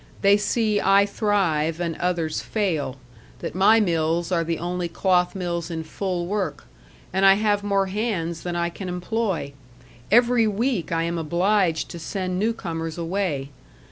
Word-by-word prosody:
They 200 +1 +6
see 210 0 +1
I 195 +1 +5
thrive 180 -7 0
and 170 -2 -2
others 170 -3 -1
fail 165 - -1 0.4
that - - -5
my 200 +5 +5
mills 170 -2 0
are 170 -2 +2
the 165 0 -2
only 175 +1 -2
cloth 180 +1 +1
mills 170 -2 -3
in 165 -1 -4
full 180 +1 -3
work, 200 +1 -3 0.5
and 190 +1 +1
I 195 0 +8
have 205 -1 +1
more 200 -1 +1
hands 185 -5 -2
than 175 -1 -4
I 170 0 0
can 185 +1 -6
employ. 180 -4 -2 0.6
Every 240 0 +4
week 215 -2 -1
I 165 0 +1
am 170 0 -2
obliged 175 +1 +1
to 170 - -7
send 185 +2 -3
new 220 +3 +2
comers 165 -6 -5
away. 165 -5 -2
180 Hz, 160 wpm, -24 LUFS, 165-205 Hz, 0.6 s, I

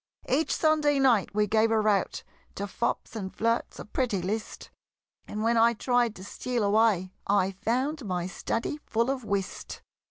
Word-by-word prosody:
Each 290 +5 +1
Sunday 305 -2 +3
night 240 -8 +3
we 210 0 +3
gave 220 +2 +3
a 225 -1 +3
rout 210 -3 +1 0.3
To 200 - -3
fops 215 +3 -3
and 190 -4 -4
flirts, 230 +1 -1
a - - -7
pretty 215 -2 -1
list; 210 +5 -4 0.6
And 210 +1 -4
when 230 +1 +2
I 230 +1 +5
tried 240 -1 +1
to 185 - -10
steal 240 +3 -2
away, 200 -3 +2
I 195 -1 +3
found 250 +9 -1
my 180 -4 -2
study 230 +9 -3
full 235 +3 +1
of 265 -2 -4
whist! 200 -3 -4
225 Hz, 165 wpm, -28 LUFS, 200-245 Hz, 0.6 s, I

